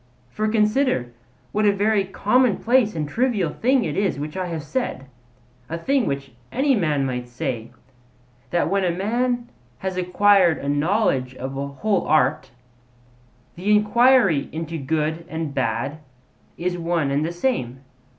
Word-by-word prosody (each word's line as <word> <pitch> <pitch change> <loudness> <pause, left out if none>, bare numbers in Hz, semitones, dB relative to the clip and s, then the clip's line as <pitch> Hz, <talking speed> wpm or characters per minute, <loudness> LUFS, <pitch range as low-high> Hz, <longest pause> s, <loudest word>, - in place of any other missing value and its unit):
For 215 +10 -1
consider 215 - +1 0.4
what 210 0 +2
a - - +6
very 200 0 +1
commonplace 225 +2 +2
and 150 -2 -2
trivial 210 - 0
thing 255 - +2
is 155 - -2
this 195 -1 0
which 150 +1 -5
I 185 -1 -2
have 165 -3 -4
said 155 - -3 0.6
a 165 - -3
thing 265 +8 +1
which 140 -1 -3 0.2
any 270 +3 +2
man 155 - +1
might 125 -2 -3
say: 120 -1 -4 0.8
that 175 - +1
when 195 0 +1
a 180 - +2
man 240 +7 -1 0.3
has 190 -1 -4
acquired 185 -1 +4
a 140 - -6
knowledge 145 - +1
of 130 +1 -6
a 140 +1 -3
whole 190 +8 -1
art, 150 -1 +2 1.1
the 185 +4 -3
enquiry 210 - +4
into 165 0 -4
good 155 +3 -1
and 160 -3 -4
bad 140 +2 -2 0.6
is 175 +1 -2
one 165 -4 0
and 145 +2 +1
the 165 - -2
same. 170 - -2
175 Hz, 150 wpm, -22 LUFS, 145-215 Hz, 1.1 s, a